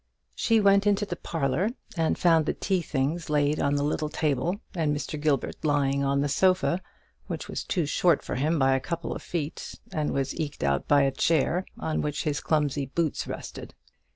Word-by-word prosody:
She 225 -1 +2
went 200 0 +4
into 205 0 +2
the 180 - -4
parlour, 160 +4 -1 0.3
and 165 -2 +1
found 165 -3 +4
the - - 0
tea 190 -3 0
things 155 +2 -2
laid 150 0 +2
on 140 0 +1
the 145 - +1
little 150 +1 -1
table, 155 +5 0
and 155 -5 0
Mr. 150 0 -5
Gilbert 145 -4 0
lying 140 -2 +2
on 140 0 +1
the 145 - +1
sofa, 185 +4 +2 0.5
which - - -5
was - - -4
too 175 -4 0
short 165 +2 +2
for - - -4
him 150 +6 +1
by 135 -1 +4
a - - +1
couple 170 +5 -4
of - - -6
feet, 160 -3 -4 0.2
and 150 -1 -1
was 135 -1 -1
eked 150 - -3
out 70 -1 +1
by 145 -1 +5
a 135 - +2
chair, 165 +5 +1
on 160 - -1
which 150 0 -2
his 145 -1 -1
clumsy 145 -3 0
boots 160 +2 -1
rested. - - -7
150 Hz, 195 wpm, -27 LUFS, 140-170 Hz, 0.5 s, by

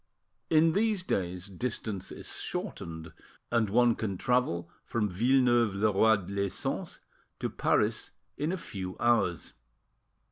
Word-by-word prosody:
In 160 +1 +5
these 210 +1 +1
days, 90 - -2
distance 100 -1 -4
is - - -5
shortened, 80 0 -5 0.4
and 115 -3 +2
one 120 +3 +4
can 100 -4 -3
travel 125 -8 +1 0.2
from 110 -3 -1
Villeneuve 120 +1 +3
le 105 +2 +2
Roi 100 -1 +4
les 100 0 -1
Sens - - -3 0.4
to - - -2
Paris - - +1 0.3
in 150 +3 -1
a 190 - -1
few 95 - -6
hours. 110 -7 +1
110 Hz, 130 wpm, -30 LUFS, 95-125 Hz, 0.4 s, In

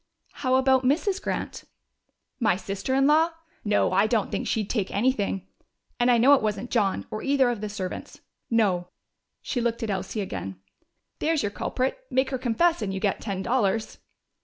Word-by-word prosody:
"How 255 -2 +2
about 265 0 +4
Mrs. 355 +9 +1
Grant?" - - -4 0.7
"My 220 -7 +3
sister 195 +6 -3
in 270 0 +4
law? 320 +3 +4 0.3
No, 205 -3 +2
I 195 +3 +3
don't 220 -3 0
think - - -2
she'd 215 -3 0
take 205 -5 -1
anything. 200 -4 0 0.5
And 245 +1 +3
I 245 - +5
know 255 +5 +6
it 280 - +5
wasn't 215 +2 -2
John 205 -5 +1
or 215 - -4
either 275 -3 +3
of 230 -4 -5
the 210 - -3
servants.... 195 -3 -6 0.3
No." 195 -6 +2 0.6
She 245 - -2
looked 235 -1 -1
at 220 - -1
Elsie 195 +3 -3
again. 95 - -5 0.6
"There's 320 -1 +1
your 205 - -1
culprit. 260 - -2
Make 260 +1 +1
her 260 - -2
confess 265 +7 +2
and 200 -2 -2
you 190 - -3
get 200 -1 0
ten 195 -3 -3
dollars!" 225 -2 0
230 Hz, 180 wpm, -26 LUFS, 200-260 Hz, 0.7 s, know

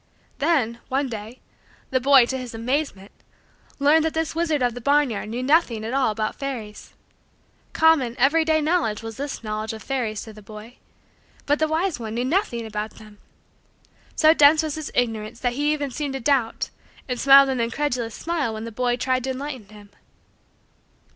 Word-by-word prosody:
Then, 275 -7 +1
one 270 +1 0
day, 225 +2 -8 0.5
the 260 - +2
boy, 270 -1 +6
to 260 - -3
his 245 -2 -7
amazement, 230 -4 -2 0.7
learned 295 +3 +4
that 320 0 -1
this 320 -1 -1
wizard 320 -4 0
of 245 -1 +1
the 245 - -8
barnyard 275 -6 +1
knew 240 +3 -3
nothing 255 -6 +2
at 230 - -4
all 270 -3 +2
about 215 0 -2
fairies. 240 -7 -7 0.8
Common, 310 -7 +3
every 290 +6 +4
day, 315 -1 +2
knowledge 300 -10 0
was 225 0 -7
this 280 -3 -5
knowledge 215 0 -3
of 220 - -9
fairies 235 -6 -2
to 220 - -11
the 215 - -13
boy: 215 +4 -12 0.7
but 290 +1 +1
the 315 - +2
wise 320 0 -1
one 220 -1 -5
knew 245 +1 -1
nothing 260 - 0
about 215 0 -5
them. 215 -2 -15 1.0
So 315 0 +6
dense 305 +1 +6
was 310 -2 -3
his 310 0 -6
ignorance 225 -1 -1
that 245 -1 0
he 290 +3 0
even 290 -3 -2
seemed 285 +1 -3
to - - -3
doubt 260 -3 0 0.4
and 250 -2 -3
smiled 275 0 +7
an 260 -2 -1
incredulous 235 -1 -2
smile 315 -9 -2
when 220 - -6
the 230 - -6
boy 245 +2 0
tried 255 0 0
to - - -3
enlighten 260 -5 -5
him. 205 -1 -15
255 Hz, 180 wpm, -23 LUFS, 225-290 Hz, 1.0 s, smiled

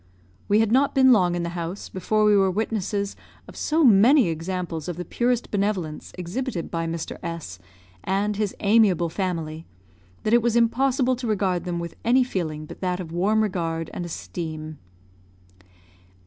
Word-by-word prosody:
We 210 +2 +4
had 220 -1 +1
not 270 +3 +3
been 260 -1 +6
long 180 -7 +4
in 175 - -2
the 170 - -2
house 170 +2 -5
before 215 +3 0
we 210 -1 +5
were 195 -1 +4
witnesses 200 0 -2 0.3
of - - -12
so 315 +1 +1
many 240 - +6
examples 165 0 -4
of 175 -2 -4
the 180 - -5
purest 245 0 -1
benevolence, 195 -6 -2
exhibited 180 +2 -4
by 165 -1 -2
Mr. 165 0 -4
S 165 - -6 0.4
and 205 +2 0
his 205 -1 -2
amiable 200 -5 +4
family, 165 -3 -3 0.6
that 215 - +1
it 240 - +6
was 235 0 +1
impossible 255 +2 +2
to 245 -1 -4
regard 190 -5 0
them 175 -1 -2
with 170 -1 -5
any 250 +3 +4
feeling 160 -10 -3
but - - -11
that 180 -1 -1
of 170 -3 -6
warm 205 +6 +2
regard 165 -5 -2
and - - -4
esteem. 155 -2 -6
190 Hz, 165 wpm, -24 LUFS, 170-220 Hz, 0.6 s, been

